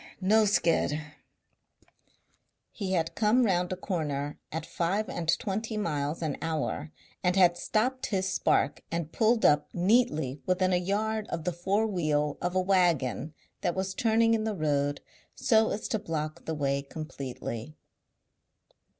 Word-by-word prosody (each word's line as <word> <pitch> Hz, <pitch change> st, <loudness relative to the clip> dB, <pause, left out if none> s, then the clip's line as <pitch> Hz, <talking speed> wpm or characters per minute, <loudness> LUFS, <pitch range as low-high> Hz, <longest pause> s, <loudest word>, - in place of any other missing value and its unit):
No 215 Hz, +3 st, +4 dB
skid." 165 Hz, -6 st, +2 dB, 1.7 s
He 195 Hz, -3 st, -3 dB
had 165 Hz, -2 st, 0 dB
come 225 Hz, +4 st, +3 dB
round 180 Hz, -3 st, +1 dB
a -, -, 0 dB
corner 150 Hz, -6 st, -3 dB
at 160 Hz, 0 st, -4 dB
five 195 Hz, +5 st, -1 dB
and 165 Hz, -2 st, -4 dB
twenty 215 Hz, +2 st, -3 dB
miles 150 Hz, -4 st, -2 dB
an 150 Hz, -3 st, -2 dB
hour 155 Hz, -1 st, -2 dB, 0.3 s
and 180 Hz, 0 st, +2 dB
had 180 Hz, -3 st, +5 dB
stopped 245 Hz, +8 st, 0 dB
his 190 Hz, -2 st, 0 dB
spark 190 Hz, -, +1 dB
and 165 Hz, -2 st, -3 dB
pulled 225 Hz, 0 st, +2 dB
up 150 Hz, 0 st, +4 dB
neatly 175 Hz, -, +2 dB
within 185 Hz, 0 st, +2 dB
a -, -, +4 dB
yard 210 Hz, +4 st, -1 dB
of 165 Hz, -1 st, -4 dB
the 180 Hz, -, -1 dB
fore 195 Hz, +6 st, +1 dB
wheel 155 Hz, -7 st, 0 dB
of 180 Hz, +1 st, -2 dB
a -, -, +4 dB
waggon 170 Hz, -6 st, +1 dB, 0.3 s
that 175 Hz, -3 st, 0 dB
was 190 Hz, 0 st, -2 dB
turning 225 Hz, +1 st, +3 dB
in 220 Hz, -1 st, +1 dB
the 220 Hz, -1 st, -1 dB
road 145 Hz, -3 st, 0 dB, 0.3 s
so 220 Hz, -1 st, +3 dB
as 215 Hz, -, -3 dB
to 220 Hz, -, 0 dB
block 155 Hz, -4 st, -4 dB
the 160 Hz, -, -2 dB
way 140 Hz, -1 st, 0 dB
completely. 140 Hz, -3 st, -6 dB
180 Hz, 150 wpm, -29 LUFS, 155-210 Hz, 1.7 s, had